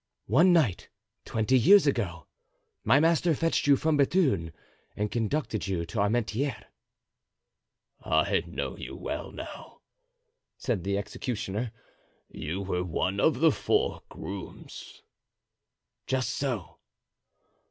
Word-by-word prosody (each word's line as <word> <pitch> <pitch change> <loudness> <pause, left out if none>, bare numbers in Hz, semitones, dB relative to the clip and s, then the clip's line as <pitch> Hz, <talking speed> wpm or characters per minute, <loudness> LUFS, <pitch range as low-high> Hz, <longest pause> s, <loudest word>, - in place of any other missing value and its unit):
"One 165 - +5
night, 150 - +2 0.4
twenty 115 +4 +2
years 195 - +7
ago, 90 - -1 0.6
my 125 +6 +5
master 165 +1 +3
fetched 165 0 0
you 140 - +7
from 155 +2 +1
Bethune 140 - +2 0.4
and 105 0 -2
conducted 115 -1 -1
you 90 -3 -1
to 85 +7 -5
Armentieres." 115 +6 0 1.4
"I - - +2
know - - -4
you - - -8
well - - -5
now," - - -10 0.8
said 110 -9 -2
the 100 +1 0
executioner; 105 +1 -3 0.6
"you 80 +6 -4
were 90 -2 -1
one 90 +3 -1
of 145 +2 +2
the 165 -1 +6
four - - 0
grooms." 95 -2 -9 1.0
"Just 130 -1 0
so." 125 -10 -3
115 Hz, 110 wpm, -28 LUFS, 100-145 Hz, 1.4 s, years